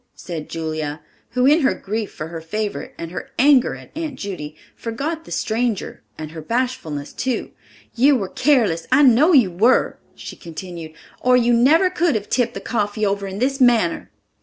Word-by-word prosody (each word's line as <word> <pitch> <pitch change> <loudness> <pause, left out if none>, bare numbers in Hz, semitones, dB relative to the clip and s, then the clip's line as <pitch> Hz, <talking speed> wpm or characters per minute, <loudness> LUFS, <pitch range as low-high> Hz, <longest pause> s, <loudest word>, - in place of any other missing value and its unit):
said 165 -4 -7
Julia, 155 -2 -4 0.4
who 250 - +4
in 295 +4 +5
her 270 -4 +2
grief 215 +1 -4
for 155 - -7
her 165 -1 -6
favorite, 210 +5 -4
and 165 0 -6
her 175 - -6
anger 270 -1 +4
at - - -14
Aunt 310 -4 -4
Judy, 180 - -6 0.2
forgot 300 +8 -4
the - - -13
stranger, 225 -1 -2 0.2
and 155 -1 -7
her 160 -1 -8
bashfulness, 165 - -3
too. 260 -2 -2 0.4
"You 275 +4 +4
were 200 -6 -1
careless, 225 - +1
I 275 +3 +6
know 270 +6 +6
you 240 - +5
were," 215 +9 +2 0.2
she - - -9
continued, 170 -1 -8 0.3
"or 250 0 +4
you 240 0 +3
never 310 +10 +4
could 340 -5 +1
have 210 -1 -3
tipped 245 -2 0
the - - -5
coffee 210 -2 -1
over 200 0 -1
in 190 0 -6
this 270 +4 0
manner." 230 -9 +3
225 Hz, 180 wpm, -21 LUFS, 170-260 Hz, 0.4 s, I